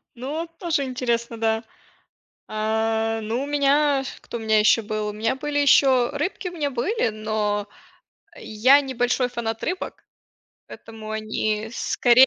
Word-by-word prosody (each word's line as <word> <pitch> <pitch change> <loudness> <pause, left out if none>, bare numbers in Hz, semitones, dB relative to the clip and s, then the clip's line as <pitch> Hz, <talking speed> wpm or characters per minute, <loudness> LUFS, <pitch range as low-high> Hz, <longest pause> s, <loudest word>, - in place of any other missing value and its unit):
Ну 295 +7 -4
тоже 330 -5 0
интересно, 235 -3 -2
да. 225 0 +1 0.8
А, 220 +1 0
ну, 230 +5 -2
у - - -3
меня 285 -1 +2 0.2
кто 235 - -6
у - - -7
меня 220 -1 +3
ещё 215 +2 +5
был? 215 0 -2
У - - -5
меня 225 +4 0
были 290 +1 -3
ещё 265 -2 +5
рыбки 360 +5 -3
у - - -12
меня 295 -4 -1
были, 260 - 0
но 215 -1 -2 0.7
я 255 +7 +4
не 265 -1 -5
большой 245 +1 +1
фанат 225 -2 -4
рыбок, 360 +3 -4 0.6
поэтому 220 -1 -10
они 215 0 -2
скорее 250 +1 +5
235 Hz, 145 wpm, -23 LUFS, 220-280 Hz, 0.8 s, ещё